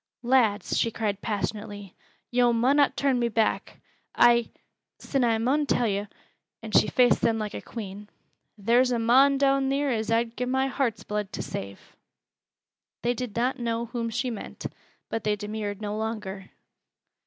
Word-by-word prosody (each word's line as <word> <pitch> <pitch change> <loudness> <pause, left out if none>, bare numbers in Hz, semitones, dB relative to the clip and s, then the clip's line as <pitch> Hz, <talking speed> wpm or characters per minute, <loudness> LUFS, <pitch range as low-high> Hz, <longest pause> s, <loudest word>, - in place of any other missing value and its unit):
"Lads," 235 -5 +2
she 230 - +2
cried 210 -3 -3
passionately, 205 -2 -4 0.4
"yo' 245 -1 +3
munnot 270 +5 +3
turn 270 -3 +1
me 235 -1 +1
back. 225 0 -1 0.4
I 235 -1 +5 0.5
sin 275 -2 -1
I 230 -2 +3
mun 275 +6 +1
tell 245 -3 +2
yo' 200 0 -1 0.3
" - - -52
and 220 -1 -4
she - - +6
faced 245 -1 +3
them 225 -1 +2
like 215 -1 -4
a - - -5
queen 205 -2 -8 0.5
"theer's 240 +5 +3
a 240 - +1
mon 265 +5 +5
down 275 -1 +2
theer 280 0 +1
as 220 -2 -1
I'd 230 0 +1
gi' 250 - -2
my 265 +1 +1
heart's 245 -5 -1
blood 210 -2 -3
to - - -3
save." 100 0 -8 1.1
They 240 +1 +2
did 245 -3 -5
not 250 +3 0
know 230 0 -1
whom 235 0 -3
she 245 +2 -2
meant, 220 - -8 0.4
but 225 - -3
they 210 -1 +1
demurred 210 0 -5
no 205 0 -3
longer. 210 -3 -5
230 Hz, 165 wpm, -26 LUFS, 210-250 Hz, 1.1 s, she